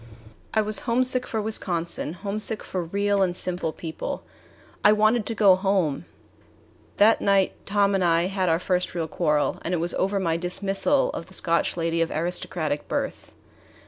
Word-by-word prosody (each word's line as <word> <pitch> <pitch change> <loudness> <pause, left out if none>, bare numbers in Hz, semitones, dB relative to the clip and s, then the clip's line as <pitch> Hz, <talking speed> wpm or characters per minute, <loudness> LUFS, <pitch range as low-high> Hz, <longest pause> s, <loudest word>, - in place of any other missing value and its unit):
I 220 - +2
was 215 -1 +2
homesick 255 +1 +2
for 220 - -2
Wisconsin, 175 -7 -2
homesick 210 +4 -3
for 185 -2 -4
real 200 +3 0
and 180 -2 +1
simple 180 -3 -2
people. 160 0 -6 0.6
I 210 - +7
wanted 215 +1 +2
to 230 - -3
go 200 -3 +6
home! 185 - 0 0.9
That 215 +2 +5
night 195 -1 +2
Tom 200 0 +2
and 190 -1 +1
I 170 -1 +3
had 190 -1 -1
our 165 - +3
first 180 0 -1
real 165 -2 -2
quarrel, 150 -2 0
and 180 - -2
it - - -1
was 170 +1 -1
over 195 +1 0
my 165 -3 0
dismissal 195 +9 +1
of 165 - -7
the 185 - -4
Scotch 170 +1 +1
lady 165 0 0
of 165 - +1
aristocratic 160 -2 -2
birth. - - -4
185 Hz, 170 wpm, -24 LUFS, 170-205 Hz, 0.9 s, I